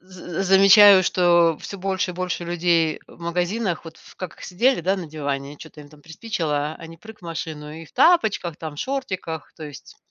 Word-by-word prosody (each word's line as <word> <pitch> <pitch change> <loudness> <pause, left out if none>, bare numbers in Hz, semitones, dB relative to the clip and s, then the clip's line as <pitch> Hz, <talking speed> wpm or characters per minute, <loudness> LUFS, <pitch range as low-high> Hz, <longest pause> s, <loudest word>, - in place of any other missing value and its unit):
з 185 -1 -7
замечаю, 195 +1 +7
что 175 -3 +3
всё 200 - -8
больше 190 -1 -2
и - - -13
больше 180 -1 -3
людей 170 -2 0
в - - -18
магазинах, 175 +2 -2
вот 165 0 -12 0.2
как 185 -3 -8
сидели, 235 +4 +1
да, 190 +4 0
на 175 -3 -6
диване, 145 -2 -5
чё-то 155 0 -13
им 145 - -13
там 150 0 -19
приспичило, 160 -5 -3
они 165 0 -11
прыг 220 +5 -14
в - - -32
машину 155 -2 -6
и - - -10
в - - -20
тапочках, 220 - +2
там 155 -2 -8
шортиках, 185 - -5
то 160 - -8
есть 145 -4 -12
175 Hz, 185 wpm, -22 LUFS, 160-190 Hz, 0.2 s, замечаю